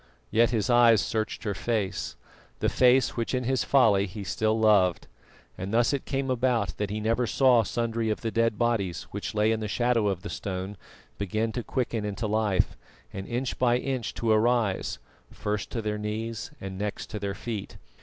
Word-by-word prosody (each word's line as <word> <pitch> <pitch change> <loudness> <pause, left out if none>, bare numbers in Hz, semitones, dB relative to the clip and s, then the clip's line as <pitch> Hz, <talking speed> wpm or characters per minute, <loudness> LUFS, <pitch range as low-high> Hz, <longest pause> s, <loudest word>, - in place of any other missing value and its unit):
Yet 115 +1 +4
his 115 -4 0
eyes 120 -3 +6
searched 110 0 -2
her 105 -3 -1
face 105 -2 -2 0.4
the - - +1
face 125 0 +4
which 115 +2 -1
in 125 - -1
his 130 +1 +1
folly 105 -7 +4
he 100 +3 -7
still 110 +3 0
loved; 100 -5 +3 0.5
and 95 +2 -4
thus 120 +4 +3
it 140 - -2
came 135 -1 -1
about 120 -4 +1
that 105 -1 -2
he 105 +1 -3
never 115 +3 +1
saw 125 -1 +5
sundry 115 0 -1
of 110 - -1
the 115 - -2
dead 115 -1 +1
bodies, 110 -8 0
which 100 +2 -5
lay 105 +1 +3
in 110 - 0
the 110 - -3
shadow 120 0 +1
of 95 -2 -2
the 100 - -5
stone, 95 +1 -4 0.4
begin 110 +3 -1
to 120 - -3
quicken 120 -3 -2
into 105 +2 -3
life, 105 -3 +1 0.4
and 95 0 -6
inch 120 +2 -3
by 120 -1 +4
inch 130 -2 -3
to 115 -1 0
arise, 110 -2 +2 0.3
first 105 -1 -3
to 115 - -4
their 105 0 -2
knees 110 +3 -4
and 95 -1 -6
next 105 0 -4
to 105 - -4
their 100 -1 -3
feet. 110 -4 -5
110 Hz, 190 wpm, -27 LUFS, 105-120 Hz, 0.5 s, eyes